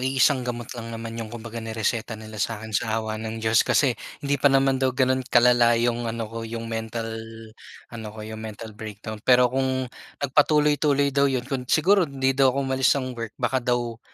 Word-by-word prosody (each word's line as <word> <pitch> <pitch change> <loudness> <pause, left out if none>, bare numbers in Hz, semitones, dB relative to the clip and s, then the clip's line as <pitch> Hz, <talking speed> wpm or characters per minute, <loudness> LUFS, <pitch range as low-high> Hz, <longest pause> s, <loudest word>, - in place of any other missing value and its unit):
iisang 130 +1 +3
gamot 120 -2 -5
lang 115 -1 -7
naman 115 0 -6
'yong 110 - -5
kumbaga 115 0 -7
nireseta 110 0 -2
nila 110 -1 -9
sa'kin, 110 +1 -3
sa 110 +2 0
awa 110 -1 -3
ng 110 0 -5
Diyos. 110 0 +4
Kasi, 140 -4 +3 0.3
hindi 140 -1 0
pa 140 - +6
naman 135 -1 +3
daw 130 - +3
gano'n 130 0 +2
kalala 120 -1 +5
'yong 120 0 0
ano 115 0 -3
ko, 115 +1 -6
'yong 115 0 -5
mental, 115 0 -4 0.8
ano 115 -2 -7
ko, 110 0 -9
'yong 110 0 -7
mental 110 0 -8
breakdown. 110 0 -8
Pero 125 +1 +4
kung, 130 0 0 0.4
nagpatuloy-tuloy 145 0 +3
daw 140 0 +3
'yon 130 -2 -1
kung 125 -2 -4
siguro, 180 +1 +4
hindi 135 -1 0
daw 135 0 +4
ako 130 +2 0
umalis 130 0 +2
ng 130 -2 -3
work 115 -2 -7
baka 130 -1 0
daw 120 -1 -1
120 Hz, 190 wpm, -24 LUFS, 115-130 Hz, 0.8 s, pa